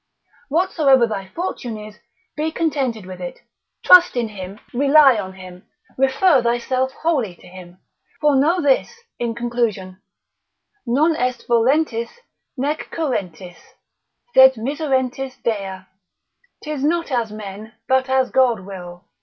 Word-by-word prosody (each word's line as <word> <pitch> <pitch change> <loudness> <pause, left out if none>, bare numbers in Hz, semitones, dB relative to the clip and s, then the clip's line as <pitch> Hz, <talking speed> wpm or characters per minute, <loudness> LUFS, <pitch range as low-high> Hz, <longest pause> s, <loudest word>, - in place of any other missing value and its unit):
Whatsoever 295 -6 +3
thy 200 -4 -5
fortune 245 - -5
is, 210 0 -11 0.4
be 310 +1 -2
contented 270 - -2
with 185 0 -9
it, 175 - -6 0.5
trust 360 -4 +7
in 235 -2 -1
him, 195 0 -9
rely 280 +1 +5
on 190 -2 -6
him, 185 -1 -13 0.3
refer 270 +3 +3
thyself 250 +2 0
wholly 270 - -1
to - - -20
him. 180 -1 -13 0.4
For 295 -2 +3
know 310 +7 +3
this, 290 - +1 0.2
in 235 -1 -2
conclusion, 230 -6 -3 0.9
Non 305 +7 +2
est 250 -3 -2
volentis 235 0 +1 0.5
nec 290 +4 -2
currentis, 185 - -4 0.8
sed 265 0 +7
miserentis 265 0 -2
Dei, 195 -5 -3 0.8
'tis 300 -3 -4
not 330 +1 0
as 235 -4 -1
men, 215 +1 -9
but 260 0 +1
as 260 -1 +1
God 245 -6 +2
will. 180 -2 -10
245 Hz, 125 wpm, -20 LUFS, 205-280 Hz, 0.9 s, trust